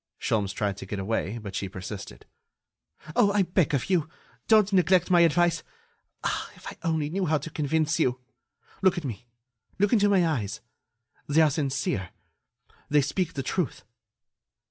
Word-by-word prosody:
Sholmes 100 -3 0
tried 100 -1 -2
to 95 - -8
get 100 - -4
away, 100 +1 -2
but 105 -4 -7
she 100 -1 -3
persisted: 95 +1 -8 0.9
"Oh! 200 - +4
I 205 -1 +3
beg 175 -4 +1
of 130 - -2
you, 170 -5 +1 0.4
don't 215 -2 +5
neglect 180 0 +3
my 175 -1 +6
advice.... 170 0 +3 0.6
Ah! - - -2
if - - -16
I - - -7
only 160 -3 0
knew 190 0 -1
how 155 0 +3
to 155 +3 -7
convince 155 +2 0
you! 125 -5 +1 0.6
Look 190 -2 +3
at 170 - -3
me! 120 -2 -6 0.5
Look 205 +3 +2
into 205 -3 +4
my 190 -3 +4
eyes! 110 -9 -2 0.7
They 150 +2 +4
are 155 -2 +4
sincere... 135 - -1 0.8
they 150 0 +4
speak 165 +5 -1
the 135 - -2
truth." 175 -4 -2
155 Hz, 165 wpm, -27 LUFS, 115-180 Hz, 0.9 s, my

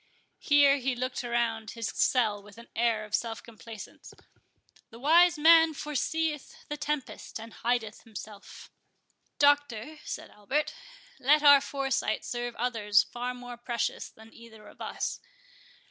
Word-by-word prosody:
(Here 285 -1 +5
he 265 -1 -1
looked 255 +1 -3
around 235 -2 -1
his 230 -2 -4
cell 215 -5 +1
with 205 +1 -16
an 235 - -13
air 230 -2 +1
of 210 - -16
self 225 0 -2
complacence.) 225 -1 -11 0.7
"The 230 - -13
wise 330 +6 +5
man 325 0 +6
forseeth 300 +1 -2
the 295 - -2
tempest, 295 -5 -4
and 225 0 -10
hideth 235 -2 -2
himself." 210 -2 -11 0.7
"Doctor," 290 -1 +2
said - - -7
Albert, 265 +9 -2 0.5
"let 295 +4 +4
our 285 -1 +8
foresight 270 -6 -2
serve 240 -1 -4
others 215 -4 +2
far 245 +1 -5
more 245 -1 -9
precious 235 -1 -3
than 220 +1 -17
either 220 -2 -14
of - - -16
us. - - -3
240 Hz, 135 wpm, -29 LUFS, 225-285 Hz, 0.7 s, our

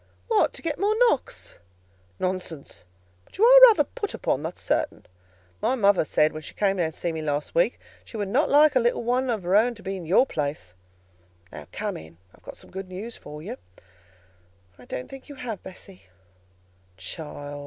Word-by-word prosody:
"What! 445 -2 +3
to - - -8
get 315 -3 -2
more 420 +3 +1
knocks?" 95 - -4 0.6
"Nonsense! 180 - -4 0.4
But - - -18
you 420 - +2
are - - +10
rather 440 - +4
put 410 - -5
upon, 130 - -1
that's 160 +3 -6
certain. - - -1 0.6
My 260 - +1
mother 200 -7 +3
said, 155 +1 +2
when 155 - -6
she - - -10
came 195 -1 +1
to 165 -3 0
see 170 +2 -3
me 160 -1 -4
last 150 -1 -2
week, - - +3
that - - -29 0.2
she 225 - -7
would 205 -2 -2
not 265 +9 +2
like 295 0 +5
a - - +6
little 240 0 +1
one 250 +2 0
of 220 -5 -1
her 180 +3 +1
own 235 +3 +4
to 210 - -15
be 195 +1 -3
in 175 -4 -7
your 195 +10 +5
place.—Now, 90 - -8
come - - -4
in, 80 +1 -13 0.2
and - - -22
I've - - -10
some - - -13
good 190 0 -6
news 210 +6 -7
for 150 +1 -10
you." - - -6 1.2
"I - - -14
don't 125 - -6
think 270 +2 -12
you 285 - -9
have, 230 -6 -6
Bessie." 190 - -12 0.9
"Child! 145 - -7
185 Hz, 195 wpm, -25 LUFS, -, 1.2 s, are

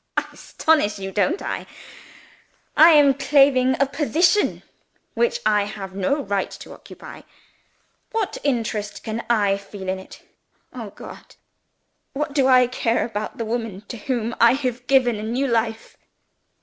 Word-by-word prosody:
"I - - +1
astonish 255 -11 0
you, 195 -1 -6
don't 250 - 0
I? - - -4 1.1
I 320 +2 +8
am 290 -2 +6
claiming 270 -2 +3
a 275 - +4
position 325 +7 +1 0.5
which 480 0 0
I 210 -1 +3
have 200 -2 -8
no 240 +10 -1
right 200 -1 -2
to - - -11
occupy. - - -12 0.9
What 445 -3 -2
interest 225 -6 -2
can 225 +1 -4
I 205 -4 +2
feel 200 -1 -10
in 190 0 -2
it? 190 - -14 0.5
Oh 235 -5 -7
God! - - -13 0.8
what 295 +1 -3
do 275 -3 +2
I 255 -1 +6
care 240 -1 -1
about 215 +4 -5
the 230 - -3
woman 225 -4 -4
to 240 - -6
whom 235 0 -3
I 235 +1 +7
have 250 -2 -3
given 255 -4 +3
a - - -6
new 240 +5 -1
life?" 225 -3 -2
240 Hz, 150 wpm, -22 LUFS, 210-275 Hz, 1.1 s, I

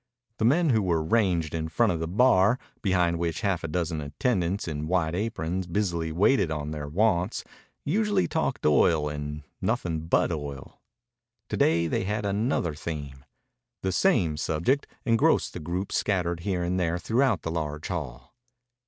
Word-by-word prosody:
The 110 - +2
men 155 +5 +4
who 110 -3 +3
were 85 -4 +1
ranged 90 -5 +1
in 80 -1 -2
front 115 +7 +2
of 85 - -2
the 80 - -2
bar, 105 +2 +4 0.2
behind 90 -4 +1
which 85 -2 -2
half 95 -4 0
a - - -2
dozen 80 -1 -2
attendants 90 - -1
in 75 -1 -3
white 85 -2 +1
aprons 90 -3 -2
busily 85 -3 -1
waited 95 - +3
on 75 -1 -3
their 75 -2 -5
wants, 90 +2 +1 0.4
usually 205 +3 +1
talked 160 -5 -2
oil 75 0 +4
and 75 0 -5 0.2
nothing 80 -2 -1
but 85 - +2
oil. 70 -3 -6 0.7
To 105 - -2
day 85 -2 +3
they 85 - -1
had 105 +1 -2
another 100 - 0
theme. 75 -3 -6 0.6
The 95 - 0
same 90 - +2
subject 85 - 0 0.2
engrossed 115 -2 +3
the - - -5
groups 90 +5 -2
scattered 90 -4 0
here 90 0 -1
and 90 +1 0
there 85 -1 0
throughout 115 +2 +1
the 80 - -3
large 75 -2 -3
hall. 75 - -5
85 Hz, 160 wpm, -27 LUFS, 80-105 Hz, 0.7 s, men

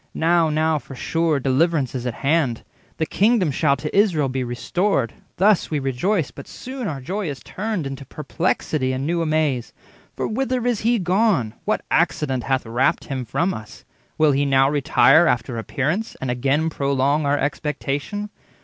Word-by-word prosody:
'Now, 165 0 +3
now, 155 0 +1
for 135 +1 -11
sure, 165 +2 0
deliverance 140 +1 +1
is 125 -1 -3
at 120 - -3
hand; 140 -6 +1 0.3
The 160 - 0
kingdom 205 -3 +2
shall 140 +1 +2
to 150 +2 -5
Israel 175 -9 +3
be 130 0 -2
restored:' 120 - -1 0.2
Thus 200 +1 +3
we 155 - -1
rejoiced, 145 +6 -1
but - - -10
soon 255 -2 -6
our 145 -4 -4
joy 185 +7 -3
is 140 - -6
turned 210 -5 -3
Into 135 0 -6
perplexity 150 -2 -2
and 130 +1 -3
new 170 +2 0
amaze. 155 -6 0 0.4
For - - -2
whither 250 +1 -1
is 240 -4 +1
he 235 +2 +2
gone? 185 - +1
what - - -1
accident 130 -5 +1
Hath 135 -2 0
rapt 120 +4 +1
him 130 -3 -4
from 170 - 0
us? 110 0 -10 0.3
will 155 -1 +4
he 140 +1 +1
now 135 -1 +4
retire 145 +2 +5
40 - - +3
After 120 0 -3
appearance, 155 - -2
and 130 -2 -2
again 140 +6 0
prolong 140 +1 +1
Our 145 +1 +2
expectation? 150 +7 -3
150 Hz, 170 wpm, -22 LUFS, 135-175 Hz, 0.4 s, retire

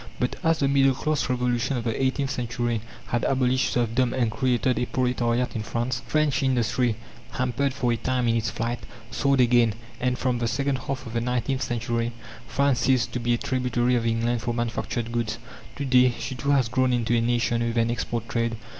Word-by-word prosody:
But 125 - 0
as 165 0 +3
the 140 - +1
middle 135 -1 +4
class 155 0 -1
Revolution 125 +1 0
of 120 - -3
the 115 +1 -2
eighteenth 135 +1 0
century 120 -1 -2 0.3
had 120 - 0
abolished 130 -1 +2
serfdom 120 +1 +1
and 120 -4 +1
created 125 +1 +1
a 125 - -1
proletariat 125 -2 0
in 110 - -1
France, 120 +3 -2
French 155 -1 +1
industry, 125 -2 +1 0.4
hampered 130 +2 0
for 125 -2 0
a - - -1
time 125 +2 0
in 115 - +2
its 115 -1 0
flight, 120 +1 -3 0.3
soared 140 -1 +1
again, 120 -3 +4 0.2
and 125 0 0
from 125 -2 0
the 120 - 0
second 135 +4 0
half 135 -1 -4
of 115 - -8
the 115 - 0
nineteenth 125 +2 -1
century 120 -1 -1 0.3
France 140 -2 +2
ceased 130 -2 +2
to 125 - -2
be 120 0 +1
a - - -2
tributary 125 -1 0
of 115 -1 +1
England 115 +1 0
for 120 +1 -2
manufactured 120 0 -2
goods. 115 -2 -1 0.4
To 140 - -3
day 125 -2 +4
she 130 - -4
too 130 +2 -3
has 135 -4 +4
grown 130 +2 +1
into 120 -1 +1
a 115 - +3
nation 120 0 +1
with 115 0 -1
an 115 0 +2
export 115 0 -3
trade. 115 -1 -1
120 Hz, 200 wpm, -25 LUFS, 115-130 Hz, 0.4 s, middle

